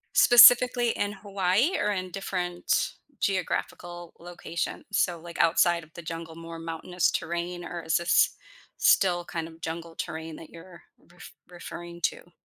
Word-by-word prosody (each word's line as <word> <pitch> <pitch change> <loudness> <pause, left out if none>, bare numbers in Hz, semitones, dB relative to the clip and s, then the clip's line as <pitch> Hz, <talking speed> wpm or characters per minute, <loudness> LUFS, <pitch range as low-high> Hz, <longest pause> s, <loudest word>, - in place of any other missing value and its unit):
Specifically 245 0 +7
in 205 - -2
Hawaii 200 - 0
or 210 - 0
in 185 -2 -4
different 180 -2 -2 0.3
geographical 175 -2 -3
locations? 170 -1 -5
So, 175 -4 0
like, 170 +1 -10
outside 170 0 +3
of 155 - -18
the 170 - -9
jungle, 165 0 -7
more 165 0 -9
mountainous 165 +2 -1
terrain, 175 +1 -4
or 175 -1 -6
is 160 +1 +1
this 170 +1 +3 0.4
still 175 -2 +3
kind 165 -2 -5
of 165 0 -15
jungle 165 0 -6
terrain 160 0 -6
that 160 - -12
you're 170 +1 -14 0.3
ref 175 - -13 0.2
referring 175 -1 -9
to? 175 - -3
175 Hz, 145 wpm, -27 LUFS, 165-185 Hz, 0.4 s, Specifically